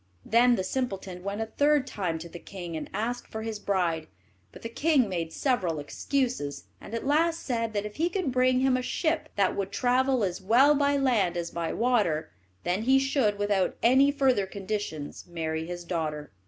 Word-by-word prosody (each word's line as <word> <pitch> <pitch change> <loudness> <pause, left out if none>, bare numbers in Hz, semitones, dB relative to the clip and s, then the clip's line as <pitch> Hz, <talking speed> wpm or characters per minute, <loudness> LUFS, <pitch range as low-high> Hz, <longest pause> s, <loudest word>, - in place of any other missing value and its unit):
Then 240 +2 +5
the 190 - -1
simpleton 190 -5 -3
went 200 +2 -3
a - - 0
third 290 +4 +2
time 180 - -2
to 165 +1 -8
the 170 +1 -10
king, 175 -2 -7
and 155 - -5
asked 230 +5 -3
for 220 0 -6
his 220 -2 -4
bride, 175 -6 0 0.4
but - - -13
the - - -2
king 275 +1 +2
made 170 -4 -3
several 190 - 0
excuses, 150 - -2 0.2
and 225 - -7
at 230 - -4
last 325 +4 +2
said 230 -3 -2
that 205 0 -1
if 210 - -8
he 330 +3 +1
could 355 -6 -1
bring 255 0 +3
him 265 -1 +3
a 255 - 0
ship 315 +5 -1
that 195 -2 +2
would 195 -1 -3
travel 255 +1 +2
as 185 0 -2
well 245 +9 +5
by 285 0 +2
land 220 -10 +2
as 170 -1 -3
by 170 -1 -2
water, 205 -11 +1 0.3
then 180 +4 0
he 260 +4 +4
should, 270 -6 +1
without 205 -2 +1
any 265 +4 +5
further 260 -8 +2
conditions, 195 -7 -5
marry 160 -2 -3
his 175 0 -6
daughter. 155 -4 -3
215 Hz, 195 wpm, -28 LUFS, 180-260 Hz, 0.4 s, Then